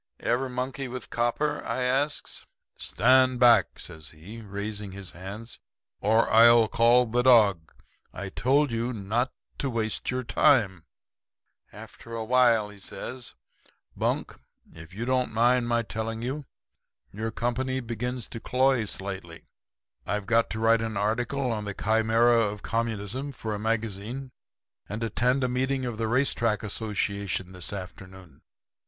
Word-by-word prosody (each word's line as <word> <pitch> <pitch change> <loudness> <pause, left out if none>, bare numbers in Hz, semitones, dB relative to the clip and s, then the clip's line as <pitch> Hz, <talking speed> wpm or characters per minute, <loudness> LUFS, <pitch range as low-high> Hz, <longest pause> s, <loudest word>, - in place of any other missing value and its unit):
"'Ever 130 +2 0
monkey 130 +1 -3
with 125 -1 -7
copper?' 120 +6 0
I 130 - -2
asks. 135 +4 -1 0.3
"'Stand 130 +3 +3
back!' 120 -2 +5
says 80 -1 -8
he, 95 +9 -11
raising 100 -1 -5
his 100 -2 -7
hand, 100 +6 -8 0.4
'or 110 +3 +3
I'll 115 0 +7
call 120 +2 +4
the 120 +2 +1
dog. 105 -10 +4 0.4
I 100 +1 -6
told 135 +6 +2
you 115 +2 -1
not 115 +4 -1 0.3
to 140 - 0
waste 110 -3 -2
your 130 0 -1
time.' 100 - +3 0.9
"After 115 0 -10
a 110 -1 -3
while 120 -3 +4
he 105 -1 -13
says: 120 +6 -7 0.6
'Bunk, - - -2 0.3
if 80 +1 -12
you 110 +6 -5
don't 130 0 +1
mind 120 +2 +3
my 120 0 +1
telling 110 +1 -4
you, 135 +4 -3 0.7
your 110 +3 -3
company 130 +3 -1
begins 120 0 -4
to 115 - -6
cloy 130 -1 +2
slightly. 95 -4 -6 0.6
I've 105 -1 -2
got 115 +2 +2
to 110 - -4
write 115 0 +4
an 110 -2 -3
article 120 +5 0
on 105 -2 -3
the 100 -1 -5
Chimera 115 +2 +3
of 105 -2 -1
Communism 115 +4 -3
for 110 -3 -4
a 105 - -4
magazine, 115 +4 -3 0.6
and 105 +3 -4
attend 125 +4 +1
a - - +2
meeting 130 +1 -1
of 120 -3 -4
the 115 - 0
Race 130 +4 +2
Track 115 -3 0
Association 100 -3 -2
this 90 -2 -4
afternoon. 95 -2 -10
115 Hz, 145 wpm, -27 LUFS, 105-125 Hz, 0.9 s, I'll